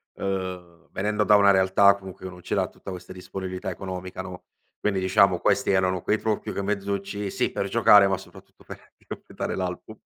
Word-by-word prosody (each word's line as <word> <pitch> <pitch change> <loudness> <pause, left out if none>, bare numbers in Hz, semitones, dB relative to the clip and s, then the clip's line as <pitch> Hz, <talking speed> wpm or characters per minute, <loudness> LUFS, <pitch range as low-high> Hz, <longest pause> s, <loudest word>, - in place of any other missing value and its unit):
ehm, 90 -3 -5
venendo 105 +2 0
da 105 - +5
una 100 -1 +6
realtà 95 +1 +5
comunque 95 -1 -11
che 95 - -6
non 90 - -13
c'era - - -1
tutta 95 - -10
questa 90 0 -9
disponibilità 95 0 -6
economica 95 0 -6
no, 95 -1 -9 0.4
quindi 100 -2 0
diciamo 95 -1 +3
questi - - +2
erano 95 -1 +1
quei 110 - +1
trucchi, 110 -2 -2
quei 100 - -3
mezzucci, 100 0 -3
sì - - -1
per 100 - -2
giocare 105 -2 +6
ma 95 -1 0
soprattutto 95 - -16
per - - -12 0.2
completare - - -5
l'album. - - -5
95 Hz, 180 wpm, -25 LUFS, 95-100 Hz, 0.4 s, una